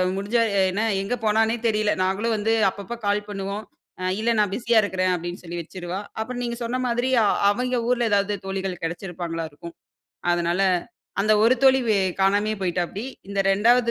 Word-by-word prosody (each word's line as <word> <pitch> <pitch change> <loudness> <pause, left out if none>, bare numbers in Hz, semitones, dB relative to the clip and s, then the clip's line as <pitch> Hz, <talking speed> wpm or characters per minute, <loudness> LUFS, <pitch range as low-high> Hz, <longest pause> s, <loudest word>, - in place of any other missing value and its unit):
முடிஞ்சா 205 +4 +1 0.3
என்ன 205 +4 -1 0.2
எங்க 200 +5 -1
போனான்னே 220 +2 +2
தெரியல. 215 -1 +2
நாங்களும் 200 +5 0
வந்து 215 +2 +1 0.2
அப்பப்ப 200 +4 -7
கால் 205 +1 +1
பண்ணுவோம். 200 +1 -4 0.4
"அ - - -4 0.2
இல்ல 230 +2 +2
நான் 205 -2 +2
பிஸியா 235 -2 +3
இருக்கிறேன்." 185 -2 0
அப்பிடின்னு 175 +1 -6
சொல்லி 175 0 -5
வச்சுருவா. 180 +2 -6 0.2
அப்பறம் 245 +3 -3
நீங்க 235 -1 -3
சொன்ன 245 +2 -2
மாதிரி, 245 +2 0
அ - - +3 0.3
அவங்க 250 +3 -1
ஊர்ல 240 -2 +2
எதாவது 205 0 +2
தோழிகள் 190 -2 -3
கிடைச்சிருப்பாங்களா 170 -1 -4
இருக்கும். 170 +3 -11 0.6
அதனால 175 +2 0 0.6
அந்த 215 +2 +2
ஒரு 240 +3 +5
தோழி 265 0 +6
வே 210 - +4 0.2
காணாமயே 205 +3 +2
போய்ட்டாப்டி. 180 +2 -2 0.2
இந்த 200 0 -3
2 235 +4 +4
205 Hz, 165 wpm, -24 LUFS, 185-230 Hz, 0.6 s, தோழி